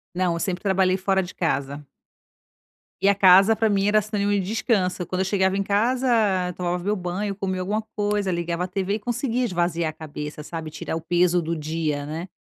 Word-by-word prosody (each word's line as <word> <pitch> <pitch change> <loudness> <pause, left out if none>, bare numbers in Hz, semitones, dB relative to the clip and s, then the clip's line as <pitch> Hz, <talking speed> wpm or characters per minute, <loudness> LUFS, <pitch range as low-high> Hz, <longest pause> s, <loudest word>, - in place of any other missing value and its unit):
Não, 180 -1 +1
eu 170 - -3
sempre 185 +1 -2
trabalhei 190 -2 +2
fora 190 0 +1
de 180 -1 -8
casa. 140 -3 -2 1.2
E 195 - +4
a 200 - +4
casa 195 +3 +6
para 220 -1 +2
mim 200 -1 +1
era 215 +1 +4
sinônimo 205 -1 -1
de 205 - +2
descanso, 190 -2 0
quando 185 +1 -3
eu 190 - +1
chegava 190 0 +1
em 200 - 0
casa, 210 -4 +1
tomava 180 0 -2
meu 205 +4 0
banho, 190 +2 -3
comia 190 -2 -3
alguma 205 +4 -1
coisa, 205 -2 0
ligava 170 0 -2
a - - -2
TV 195 +1 -2
e - - -4
conseguia 245 +2 -1
esvaziar 175 -6 0
a - - -7
cabeça, 150 -1 -7
sabe, 160 0 -6
tirar 155 +1 -5
o 165 - -3
peso 175 +1 +2
do 165 0 -3
dia, 155 -2 -2
né. 165 +5 -6
185 Hz, 205 wpm, -24 LUFS, 170-205 Hz, 1.2 s, casa